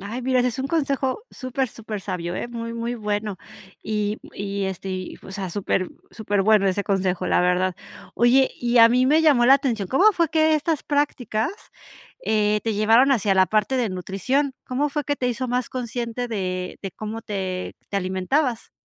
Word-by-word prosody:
Ay, 225 +6 -5
mira, 255 0 +2
ese 250 - +2
es 245 - -6
un 265 - -1
consejo 275 - -1
súper, 255 0 -3
supersabio, 190 -6 -5
¿eh?, - - -4
muy, 230 -1 -5
muy 235 +1 -3
bueno, 210 -2 -2 0.4
y 210 0 -2 0.2
y, 200 0 -3
este, 190 0 -4
y, 185 -1 -5
o - - -11
sea, 190 -2 -4
súper, 185 0 -1 0.2
superbueno 205 -1 +2
ese 195 +2 +1
consejo, 185 -2 0
la - - +3
verdad, 180 +1 +1 0.4
oye, 255 +3 +4
y 240 0 +1
a 230 - +9
mí 250 +2 +3
me 310 +3 +4
llamó 270 -6 +5
la 270 - +8
atención, 235 -8 -1
¿cómo 380 - +5
fue 335 -3 +1
que 315 -1 +3
estas 305 0 -1
prácticas, 280 - -1 0.7
eh, 210 -1 +2
te 225 - 0
llevaron 225 +6 +5
hacia 205 -5 +2
la 190 0 +5
parte 215 +6 +1
de 245 -3 +1
nutrición?, 195 +10 -1
¿cómo 275 +4 -1
fue 295 0 -3
que 290 - 0
te 250 -3 -1
hizo 255 +2 -2
más 250 0 -1
consciente 245 -1 -4
de 185 -5 -3
de 195 - -4
cómo 220 +3 -6
te 190 -4 -4
te 200 - -3
alimentabas? 200 +8 -1
225 Hz, 185 wpm, -23 LUFS, 195-260 Hz, 0.7 s, a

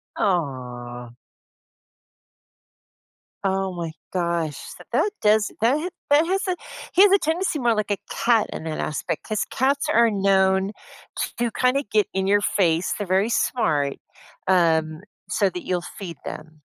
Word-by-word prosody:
Aw. 125 -8 -2 2.3
Oh 190 -1 0
my 170 -2 -4 0.2
gosh, 170 -4 -1 0.2
so - - -13
that 415 - +2
does 215 0 +3
that 245 +6 +4
ha 345 +4 -3 0.2
that 295 +3 +5
has 380 +3 0
a 365 - +1 0.4
he 380 - +7
has 405 - +6
a 395 - +6
tendency 325 -1 0
more 235 -2 +2
like 210 -1 -1
a 200 - +1
cat 230 -2 +2
in - - -6
that 160 -1 -4
aspect 150 - -3
'cause 215 -1 -1
cats 275 +2 +1
are 235 0 +5
known 195 -1 +2 0.7
to 235 -1 0
kinda 255 +3 +1
get 210 -2 +3
in 190 0 0
your 205 +1 +4
face- 175 -4 +1
they're 205 - -3
very 190 +5 +2
smart- 145 - +1 0.5
um, 160 -3 +2 0.3
so 200 -3 +2
that 180 -1 -7
you'll 180 -1 0 0.2
feed 170 -7 -6
them. 155 0 -8
195 Hz, 150 wpm, -23 LUFS, 165-235 Hz, 2.3 s, he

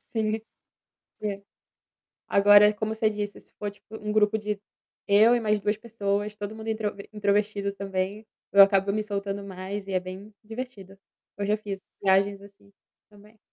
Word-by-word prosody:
Sim. 220 -1 0 0.8
É. 200 -1 -2 0.9
Agora, 205 +1 +7
como 215 +1 -2
você 220 0 +2
disse, 205 -1 -4
se - - -17
for 205 -1 -3
tipo 210 +2 -12
um 210 -1 -4
grupo 215 0 +3
de 210 -1 -3 0.5
eu 215 +4 +6
e 240 - +1
mais 210 -1 +2
2 210 +1 0
pessoas, 210 -2 -2
todo 205 +1 -5
mundo 220 0 -8
introv 215 -2 -2
introvertido 205 -1 0
também, 195 +2 -3 0.3
eu 200 0 +10
acabo 195 0 +4
me 215 0 0
soltando 200 -1 -3
mais 195 +1 -6
e - - -4
é 185 - +2
bem 190 +3 -9
divertido. 215 -4 -8 0.4
Eu 200 - -2
já 210 +1 +2
fiz 200 -2 -6 0.2
viagens 195 +1 +3
assim 200 0 -17 0.4
também. 210 +1 -19
205 Hz, 165 wpm, -26 LUFS, 200-215 Hz, 0.9 s, eu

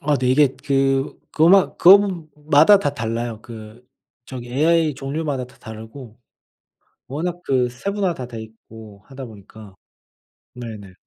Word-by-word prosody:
아 145 0 +1
네. 125 -1 -1
이게 135 0 +3
그 135 -1 0
그거 160 +1 +3
마 195 +1 +4
그거 190 -3 +5
마다 150 +6 +5
다 145 -6 -2
달라요. 115 -2 -4
그 115 +1 -12 0.4
저기 125 -2 -8
에이아이 155 +3 +2
종류마다 140 0 -4
다 125 - -21
다르고 110 +2 -11 0.9
워낙 170 +6 -4
그 125 -2 +1
세분화가 195 +8 -3
다 130 -5 -7
돼있고 110 -2 -12
하다 135 -1 -9
보니까. 105 -2 -14 0.8
네네. 110 -6 -9
130 Hz, 265 characters per minute, -21 LUFS, 115-155 Hz, 0.9 s, 그거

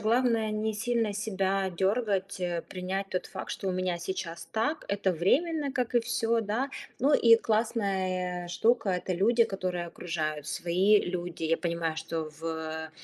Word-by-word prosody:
главное 225 0 +2
не 215 +1 -1
сильно 230 -1 0
себя 195 -2 0
дёргать, 195 +1 0
э, 175 -2 -1
принять 190 +1 -3
тот 185 - -2
факт, 190 - -6
что 195 - -3
у - - +2
меня 180 -1 -1
сейчас 170 -1 -5
так, 290 +8 -1
это 195 -2 +1
временно, 285 - +1
как 250 -2 -2
и 240 - +6
всё, 230 0 +1
да. 225 +6 -1 0.3
Ну 285 +3 +4
и 230 -3 +7
классная 190 -6 0
штука- 220 +5 +2
это 185 0 -1
люди, 225 +6 +4
которые 180 -3 -3
окружают, 155 -3 -3
свои 185 +6 +3
люди. 175 -2 -4
Я 165 +1 +2
понимаю, 170 -2 -2
что 160 0 -3
в 160 -1 -4
190 Hz, 155 wpm, -29 LUFS, 175-225 Hz, 0.3 s, и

